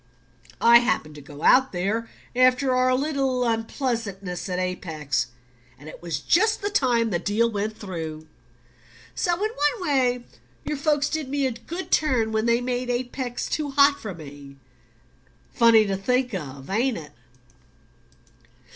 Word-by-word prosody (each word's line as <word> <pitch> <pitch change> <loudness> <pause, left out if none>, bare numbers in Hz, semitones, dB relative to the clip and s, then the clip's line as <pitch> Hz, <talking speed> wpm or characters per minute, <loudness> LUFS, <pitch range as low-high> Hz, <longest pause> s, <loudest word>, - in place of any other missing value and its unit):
I 235 0 +7
happened 195 -10 -1
to 150 - -11
go 145 +2 -11
out 265 +1 +5
there 205 +6 -2 0.3
after 255 +1 +3
our 255 0 +3
little 270 -2 0
unpleasantness 225 -6 -3
at 180 - -2
Apex, 160 -7 -2 0.5
and 145 +3 -14
it - - -10
was 165 -4 -3
just 430 - +2
the 410 - -1
time 240 - +2
the 175 - 0
deal 225 +5 +1
went 215 +1 -3
through. 160 -5 -6 0.9
So 350 -3 0
in 425 +5 -2
one 350 +1 -1
way 250 -3 +1 0.4
your 300 - -2
folks 290 0 +1
did 310 -4 -3
me 280 0 0
a 260 - +1
good 330 +11 -7
turn 250 -8 +2
when 220 +1 0
they 235 +1 +3
made 245 0 -2
Apex 245 0 -3
too 300 -2 -2
hot 280 +1 +4
for 205 -5 -6
me: 140 -3 -12 1.0
funny 230 -2 +6
to 195 -1 -1
think 250 +4 0
of, 140 -6 -6
ain't 240 +4 +1
it?" 155 -3 -9
235 Hz, 150 wpm, -24 LUFS, 185-265 Hz, 1.0 s, I